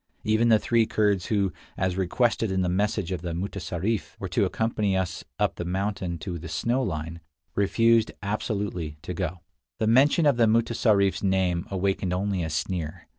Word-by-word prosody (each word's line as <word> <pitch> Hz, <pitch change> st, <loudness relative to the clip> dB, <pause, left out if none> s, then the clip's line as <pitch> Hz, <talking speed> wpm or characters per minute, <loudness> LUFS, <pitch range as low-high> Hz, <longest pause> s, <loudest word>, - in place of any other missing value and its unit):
Even 110 Hz, +2 st, +3 dB
the 110 Hz, -, +7 dB
three 115 Hz, +1 st, +2 dB
Kurds 100 Hz, -4 st, +1 dB
who, 100 Hz, -4 st, +1 dB, 0.2 s
as 95 Hz, -1 st, 0 dB
requested 115 Hz, +4 st, +1 dB
in 95 Hz, -1 st, +1 dB
the -, -, 0 dB
message 100 Hz, 0 st, 0 dB
of 90 Hz, -3 st, -2 dB
the 85 Hz, -1 st, -4 dB
mutessarif, 100 Hz, +2 st, -3 dB
were -, -, -4 dB
to -, -, +2 dB
accompany 105 Hz, -4 st, 0 dB
us 90 Hz, -2 st, -2 dB
up -, -, 0 dB
the -, -, -3 dB
mountain 95 Hz, -1 st, -2 dB
to 85 Hz, +2 st, -5 dB
the 80 Hz, 0 st, -8 dB
snow 120 Hz, +10 st, 0 dB
line, 85 Hz, -6 st, -3 dB, 0.3 s
refused 115 Hz, +3 st, +3 dB
absolutely 100 Hz, -6 st, -3 dB
to 90 Hz, -, -4 dB
go. 90 Hz, -1 st, -3 dB, 0.4 s
The 110 Hz, -, 0 dB
mention 135 Hz, +8 st, +4 dB
of 140 Hz, -4 st, +4 dB
the 115 Hz, -2 st, +5 dB
mutessarif 110 Hz, -3 st, +3 dB
s -, -, -7 dB
name 95 Hz, -3 st, +1 dB
awakened 95 Hz, -1 st, -1 dB
only 95 Hz, 0 st, -1 dB
a 80 Hz, -, -3 dB
sneer. 80 Hz, 0 st, -3 dB
95 Hz, 175 wpm, -26 LUFS, 90-110 Hz, 0.4 s, the